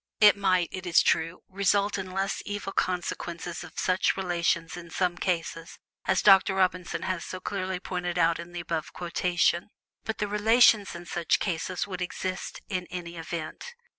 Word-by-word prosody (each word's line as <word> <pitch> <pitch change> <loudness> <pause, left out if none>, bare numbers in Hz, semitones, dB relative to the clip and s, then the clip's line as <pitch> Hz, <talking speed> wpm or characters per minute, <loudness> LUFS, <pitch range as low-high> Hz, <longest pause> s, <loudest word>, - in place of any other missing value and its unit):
It 210 -1 +8
might, 185 -3 +2
it 185 -1 -6
is 170 - +5
true, 165 +2 +1
result 200 +1 +1
in 190 -1 -5
less 195 +2 -2
evil 205 -1 -4
consequences 175 -1 -2
of 170 -2 -13
such 185 +1 +2
relations 170 -2 0
in 175 -1 -9
some 180 +1 0
cases, 170 -2 -3 0.3
as 190 - +2
Dr. 195 -1 +6
Robinson 185 -2 0
has 185 -3 -2
so 185 - -6
clearly 190 -1 -3
pointed 180 -1 -3
out 165 -1 +3
in 170 +1 -8
the 175 0 -5
above 165 -2 -3
quotation; 175 +1 +1 0.3
but 220 - -3
the 210 - -1
relations 210 -1 +4
in 170 0 -8
such 170 -1 +1
cases 175 -1 -2
would 185 -3 -6
exist 185 +1 -4
in 185 -2 -3
either 175 -1 -6
event. 165 - -6
180 Hz, 165 wpm, -28 LUFS, 170-195 Hz, 0.3 s, It